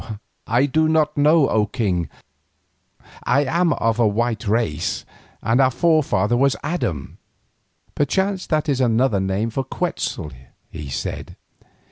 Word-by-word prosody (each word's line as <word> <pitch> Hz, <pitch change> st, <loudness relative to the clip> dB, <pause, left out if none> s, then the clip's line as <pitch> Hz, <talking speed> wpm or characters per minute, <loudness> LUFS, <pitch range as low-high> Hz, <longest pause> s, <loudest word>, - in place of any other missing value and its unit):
"I 120 Hz, +5 st, +3 dB
do 155 Hz, +3 st, +2 dB
not 155 Hz, -1 st, +2 dB
know, 150 Hz, 0 st, +4 dB
O 105 Hz, -1 st, +2 dB
king. 95 Hz, -7 st, -1 dB, 1.1 s
I 140 Hz, +4 st, +2 dB
am 170 Hz, +5 st, +1 dB
of 115 Hz, -2 st, 0 dB
a 115 Hz, -, +4 dB
white 115 Hz, +1 st, -1 dB
race, 100 Hz, -8 st, -1 dB, 0.4 s
and 115 Hz, +4 st, +3 dB
our 130 Hz, -, +5 dB
forefather 130 Hz, -, +2 dB
was 135 Hz, +2 st, +3 dB
named 150 Hz, -, -2 dB
Adam." 85 Hz, -, -3 dB, 0.8 s
"Perchance 190 Hz, +6 st, 0 dB
that 155 Hz, -1 st, 0 dB
is 135 Hz, -3 st, +1 dB
another 120 Hz, -3 st, +2 dB
name 95 Hz, +4 st, -1 dB
for 135 Hz, +4 st, -2 dB
Quetzal," 130 Hz, -, -3 dB, 0.4 s
he 75 Hz, -3 st, -7 dB
said. -, -, -5 dB
125 Hz, 135 wpm, -21 LUFS, 105-150 Hz, 1.1 s, our